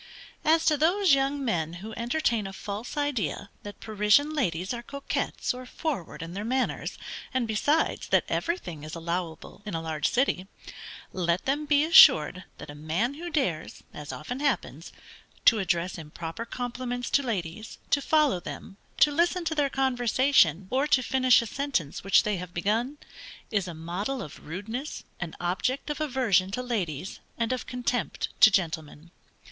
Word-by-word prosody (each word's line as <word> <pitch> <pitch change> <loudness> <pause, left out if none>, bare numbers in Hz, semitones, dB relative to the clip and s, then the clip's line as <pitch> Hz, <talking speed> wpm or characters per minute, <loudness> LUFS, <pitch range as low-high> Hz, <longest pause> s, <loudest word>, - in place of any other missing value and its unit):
As 320 +1 +4
to 305 - +4
those 350 +3 +4
young 275 +1 +1
men 165 -8 -1
who 205 +6 -8
entertain 235 -3 0
a 195 - -8
false 205 +7 -6
idea 240 - -2
that 205 0 -9
Parisian 215 +8 +3
ladies 185 - -1
are 240 - -4
coquettes 280 +1 -3
or 250 0 -9
forward 250 - -4
in 165 +1 -7
their 200 +2 -4
manners, 255 +3 -1 0.4
and 250 -3 +1
besides, 290 +9 +1
that - - +3
everything 180 - -3
is 155 +2 -7
allowable 170 +1 -4
in 210 -5 -5
a - - -1
large 155 -2 -1
city, 240 -8 +1 0.7
let 175 -1 0
them 290 +3 0
be 290 0 +4
assured 185 - +7
that - - -9
a - - -9
man 160 - -1
who 340 +4 -6
dares 185 - -2
(as 150 0 -7
often 245 - -5
happens) 205 - -2 0.5
to 225 - +7
address 175 -1 -1
improper 165 +6 -6
compliments 245 0 -4
to 280 - +4
ladies, 215 -4 -4
to 285 - +3
follow 300 - +3
them, 195 +2 -8 0.2
to 295 - +5
listen 345 +3 +1
to 320 - 0
their 290 -3 +1
conversation, 250 - +3
or 270 +3 +2
to 265 -4 +3
finish 255 -1 +4
a - - -6
sentence 245 - -2
which 195 - +5
they 210 -2 0
have 180 0 -8
begun, 225 +10 0 0.5
is 200 -4 0
a 170 - -6
model 185 +11 -3
of 150 - -11
rudeness, 220 - -5 0.2
an 175 -3 -5
object 220 +12 -1
of 295 - -4
aversion 240 - +2
to 250 +6 -3
ladies, 185 - -3 0.2
and 230 +1 0
of 255 - -4
contempt 250 -1 -2
to - - +9
gentlemen. 165 -4 -2
225 Hz, 165 wpm, -27 LUFS, 175-275 Hz, 0.7 s, to